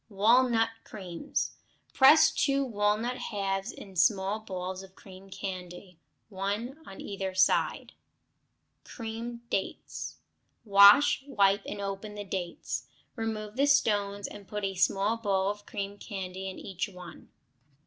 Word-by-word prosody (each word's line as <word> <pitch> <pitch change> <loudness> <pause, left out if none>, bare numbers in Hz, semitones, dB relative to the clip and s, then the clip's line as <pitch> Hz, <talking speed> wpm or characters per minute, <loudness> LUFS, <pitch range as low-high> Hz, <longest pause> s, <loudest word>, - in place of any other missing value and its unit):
Walnut 225 +3 +4
Creams 180 -5 -4 0.4
Press 280 +4 +7
two 275 -1 +1
walnut 220 +2 0
halves 195 +1 -2
on 195 -1 -12
small 195 +3 +2
balls 185 -3 -5
of 190 0 -14
cream 190 0 -14
candy, 180 -2 -7 0.3
one 210 +8 -3
on 195 - -10
either 195 -2 -4
side. 185 - +2 0.9
Creamed 235 +1 -7
Dates 190 - -4 0.5
Wash, 200 +8 +7
wipe, 200 -6 +3
and 205 - -5
open 200 +1 -5
the 205 - -5
dates; 185 -3 -4 0.3
remove 220 -1 -4
the 280 +1 +3
stones 205 -7 +2
and 205 -2 -11
put 210 +1 -5
a 195 - -2
small 195 +4 +1
ball 195 -3 +1
of 205 0 -11
cream 200 -2 -5
candy 190 -1 -5
into 190 - -9
each 190 +2 -3
one. 180 -2 -12
200 Hz, 130 wpm, -29 LUFS, 190-225 Hz, 0.9 s, Press